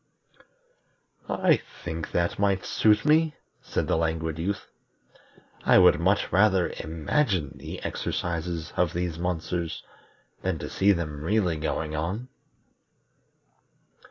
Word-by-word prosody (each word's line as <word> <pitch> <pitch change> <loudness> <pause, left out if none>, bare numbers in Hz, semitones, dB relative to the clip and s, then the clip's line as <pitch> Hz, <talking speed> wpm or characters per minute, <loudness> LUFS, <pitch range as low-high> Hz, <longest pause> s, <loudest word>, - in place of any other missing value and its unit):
"I 180 -5 +3 0.3
think 80 -1 -4
that 85 +2 0
might 100 -2 +1
suit 105 +1 +3
me," 155 0 +4 0.3
said - - -2
the - - +2
Languid 80 -1 -1
Youth. 95 +4 -2 1.0
"I - - +6
would 90 -5 +6
much 95 +4 +1
rather 95 -2 +3
imagine 85 - 0
the - - -7
exercises 85 -1 -3
of 90 -3 +1
these 85 -2 -2
monsters 85 -1 -2 0.6
than 95 -3 -1
to - - -6
see 100 +1 +4
them 75 -5 -2
really 95 -2 +1
going 75 0 -2
on." 95 +11 -3
90 Hz, 115 wpm, -26 LUFS, 80-100 Hz, 1.0 s, I